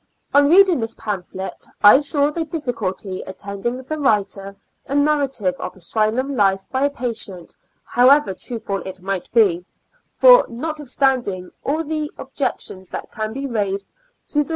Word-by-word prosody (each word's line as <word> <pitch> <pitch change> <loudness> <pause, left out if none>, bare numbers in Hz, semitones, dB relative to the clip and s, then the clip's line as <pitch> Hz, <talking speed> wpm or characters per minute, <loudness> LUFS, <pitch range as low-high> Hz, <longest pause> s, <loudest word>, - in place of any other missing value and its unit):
On 285 0 +5
reading 370 -2 +6
this 225 -1 -3
pamphlet, 190 -3 -5 0.2
I 205 +6 +9
saw 290 0 +1
the 330 +2 -2
difficulty 230 - -4
attending 200 +5 -5
the 310 +4 -4
writing 200 -6 0 0.3
a 275 - -3
narrative 285 -9 +1
of - - -6
asylum 220 +9 0
life 195 -3 +2
by 265 +1 +1
a - - +2
patient, 230 -9 -4 0.3
however 255 -2 +4
truthful 220 -1 -3
it 190 +1 -8
might 190 0 -4
be; 190 -7 +3 0.5
for, - - +7
notwith 295 +4 -5
standing 240 -9 0
all 310 +4 0
the 305 -1 -3
objections 185 -1 -4
that - - -7
can 215 0 -4
be 275 +4 -5
raised 200 -5 -2 0.4
to 295 - 0
the 295 - +2
Preface. - - -17
235 Hz, 150 wpm, -20 LUFS, 195-285 Hz, 0.5 s, I